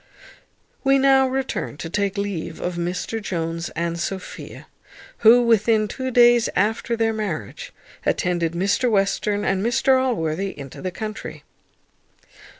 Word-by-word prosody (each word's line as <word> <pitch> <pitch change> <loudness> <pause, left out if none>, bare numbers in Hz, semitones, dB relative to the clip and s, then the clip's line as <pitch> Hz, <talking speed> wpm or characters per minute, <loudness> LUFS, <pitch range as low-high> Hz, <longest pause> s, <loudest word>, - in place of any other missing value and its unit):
We 275 0 +4
now 270 0 +4
return 260 - -3
to 165 - -6
take 200 +3 -1
leave 195 -5 -4
of 180 - -3
Mr 180 +6 -3
Jones 165 -3 -3
and 170 +1 -2
Sophia, 190 +2 -6 0.5
who, 240 +2 +7
within 220 -1 +3
two 260 +5 -4
days 240 -1 +5
after 225 +4 0
their 225 0 +1
marriage, 190 - -5 0.3
attended 170 -2 0
Mr 200 +8 +1
Western 205 0 0
and 190 0 0
Mr 260 +2 +3
Allworthy 190 - -2
into 140 -2 -9
the 185 - -2
country. 215 +4 -7
205 Hz, 130 wpm, -22 LUFS, 175-235 Hz, 0.5 s, who